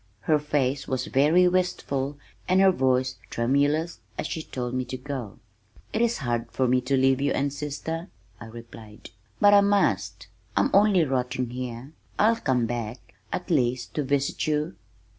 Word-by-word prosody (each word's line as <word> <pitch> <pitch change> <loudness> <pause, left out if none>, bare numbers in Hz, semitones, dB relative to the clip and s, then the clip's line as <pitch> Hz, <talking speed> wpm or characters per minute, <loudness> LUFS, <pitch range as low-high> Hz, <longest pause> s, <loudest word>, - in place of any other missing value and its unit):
Her 155 -1 +2
face 140 -2 -1
was 130 -1 -2
very 155 +7 +4
wistful 145 -6 -1 0.3
and 185 +1 +3
her 195 0 +6
voice 130 -4 +1
tremulous 145 +7 +1 0.2
as - - -3
she 160 - -3
told 125 -5 -5
me 130 0 0
to 130 +1 -5
go. 130 -6 -6 0.6
"It 220 - 0
is 235 0 +2
hard 120 -1 -2
for 130 - +1
me 125 +1 +3
to 135 +2 0
leave 135 0 +3
you 145 - +1
and 140 0 -1
sister," 150 +4 -4 0.3
I - - -9
replied, 110 -4 -12 0.3
"but 205 0 +6
I 200 - +8
must. 105 - +1 0.3
I'm 100 - +3
only 200 -3 +5
rotting 125 -2 -2
here. 125 +1 -6 0.3
I'll 225 +2 +4
come 130 - +1
back 115 0 -5 0.2
at 180 0 -4
least 125 -5 0
to 150 - -1
visit 140 +2 -1
you." 150 -8 -1
135 Hz, 165 wpm, -26 LUFS, 125-160 Hz, 0.6 s, I